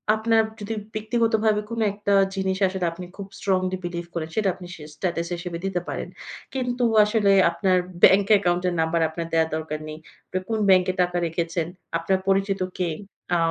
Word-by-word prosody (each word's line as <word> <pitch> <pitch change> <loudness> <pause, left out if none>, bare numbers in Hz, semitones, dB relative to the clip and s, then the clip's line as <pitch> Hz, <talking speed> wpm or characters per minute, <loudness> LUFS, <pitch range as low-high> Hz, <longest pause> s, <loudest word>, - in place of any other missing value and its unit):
আপনার 225 0 +3 0.2
যদি 210 +1 -4 0.2
ব্যক্তিগতভাবে 220 -1 +1
কোন 230 0 -4
একটা 205 0 -1 0.2
জিনিস 190 0 -1
আসলে 185 -1 -2
আপনি 180 +2 -8
খুব 200 - -6
স্ট্রংলি 185 -1 0
বিলিভ 175 0 -4
করেন। 160 -2 -3
সেটা 210 -3 +2
আপনি 180 -2 -10
সে 155 - -11
স্টেটাস 170 0 -2
হিসেবে 175 0 -5
দিতে 185 -2 -1
পারেন। - - -4 0.5
কিন্তু 250 -1 -1 0.2
আসলে 210 -1 +2 0.2
আপনার 185 +2 +1 0.3
ব্যাংক 195 +1 +7
অ্যাকাউন্ট 180 -3 +2
এর 180 - 0
নাম্বার 160 +1 +1
আপনার 165 +1 -5
দেয়ার 160 -1 +3
দরকার 155 -1 -4
নেই। 155 0 -7 0.5
কোন 220 -1 0
ব্যাংকে 185 -1 +5
টাকা 180 0 0
রেখেছেন, 165 0 -2 0.3
আপনার 185 +3 0
পরিচিত 195 0 +2 0.2
কে, 180 -2 0 0.5
আ - - +4
185 Hz, 170 wpm, -24 LUFS, 170-210 Hz, 0.5 s, ব্যাংক